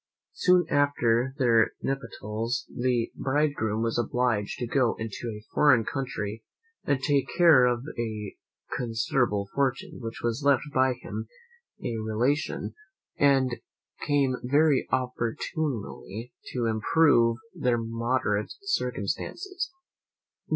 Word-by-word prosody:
Soon 180 Hz, -1 st, +4 dB
after 130 Hz, -3 st, +2 dB
their 115 Hz, -5 st, +4 dB
nuptials 115 Hz, -3 st, -3 dB
the 120 Hz, -2 st, 0 dB
bridegroom 130 Hz, -6 st, 0 dB
was 115 Hz, 0 st, 0 dB
obliged 120 Hz, -3 st, 0 dB
to 120 Hz, -, -2 dB
go 125 Hz, -1 st, +2 dB
into 110 Hz, +1 st, -5 dB
a 105 Hz, 0 st, -9 dB
foreign 130 Hz, -7 st, +5 dB
country, 110 Hz, -5 st, -4 dB, 0.4 s
to 140 Hz, -, +3 dB
take 135 Hz, 0 st, +1 dB
care 165 Hz, -8 st, +7 dB
of 120 Hz, 0 st, +1 dB, 0.2 s
a 110 Hz, -3 st, -4 dB, 0.4 s
considerable 115 Hz, -3 st, 0 dB
fortune, 135 Hz, -2 st, -1 dB
which 115 Hz, -1 st, -6 dB
was 120 Hz, +3 st, -1 dB
left 140 Hz, -2 st, +4 dB
him 145 Hz, -1 st, -11 dB
by 130 Hz, -1 st, +3 dB, 0.9 s
a 115 Hz, -, -2 dB
relation, 115 Hz, +7 st, -1 dB, 0.5 s
and 135 Hz, -3 st, +3 dB, 0.5 s
came 140 Hz, -3 st, +2 dB
very 145 Hz, +2 st, +3 dB
opportunely 125 Hz, -, -3 dB, 0.2 s
to 120 Hz, -2 st, -1 dB
improve 115 Hz, +1 st, +3 dB, 0.2 s
their 125 Hz, -2 st, +1 dB
moderate 115 Hz, -2 st, -1 dB
circumstances. 380 Hz, -1 st, -2 dB
125 Hz, 110 wpm, -27 LUFS, 115-140 Hz, 0.9 s, care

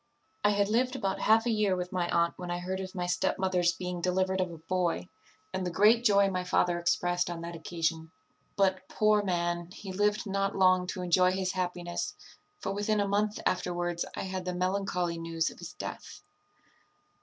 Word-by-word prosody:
"I 205 Hz, -, +5 dB
had 200 Hz, -1 st, +2 dB
lived 250 Hz, +4 st, +1 dB
about 195 Hz, -7 st, -1 dB
half 225 Hz, +1 st, +4 dB
a 240 Hz, -, +2 dB
year 210 Hz, -3 st, +2 dB
with 180 Hz, 0 st, -4 dB
my 180 Hz, -2 st, -1 dB
aunt 170 Hz, 0 st, +2 dB
when 180 Hz, -1 st, -7 dB
I 175 Hz, -, -1 dB
heard 185 Hz, +2 st, -3 dB
of 190 Hz, 0 st, -6 dB
my 180 Hz, -1 st, -1 dB
stepmother's 180 Hz, 0 st, +1 dB
being 180 Hz, -1 st, -4 dB
delivered 185 Hz, +1 st, +1 dB
of 185 Hz, -, -1 dB
a 165 Hz, -, -8 dB
boy, 175 Hz, +2 st, -1 dB, 0.4 s
and 185 Hz, 0 st, -2 dB
the 180 Hz, -, -1 dB
great 215 Hz, +7 st, +4 dB
joy 200 Hz, -3 st, +5 dB
my 185 Hz, -1 st, -1 dB
father 180 Hz, -1 st, +1 dB
expressed 175 Hz, +1 st, +1 dB
on 170 Hz, -1 st, -5 dB
that 170 Hz, 0 st, -6 dB
occasion; 160 Hz, -1 st, -2 dB, 0.5 s
but, 190 Hz, -1 st, +1 dB
poor 215 Hz, -1 st, +3 dB
man, 175 Hz, -2 st, -1 dB
he 190 Hz, +1 st, -8 dB
lived 210 Hz, +3 st, +1 dB
not 195 Hz, 0 st, -1 dB
long 185 Hz, -1 st, +4 dB
to 185 Hz, 0 st, -4 dB
enjoy 180 Hz, +1 st, +4 dB
his 190 Hz, -1 st, -1 dB
happiness; 180 Hz, -1 st, -3 dB, 0.5 s
for 195 Hz, -, -2 dB
within 205 Hz, +1 st, 0 dB
a 200 Hz, -, +1 dB
month 205 Hz, +1 st, 0 dB
afterwards 175 Hz, -1 st, 0 dB
I -, -, -3 dB
had 185 Hz, -1 st, -4 dB
the 180 Hz, -1 st, -2 dB
melancholy 180 Hz, -2 st, -1 dB
news 165 Hz, -1 st, -1 dB
of -, -, -15 dB
his -, -, -8 dB
death. -, -, -8 dB
185 Hz, 190 wpm, -30 LUFS, 175-195 Hz, 0.5 s, I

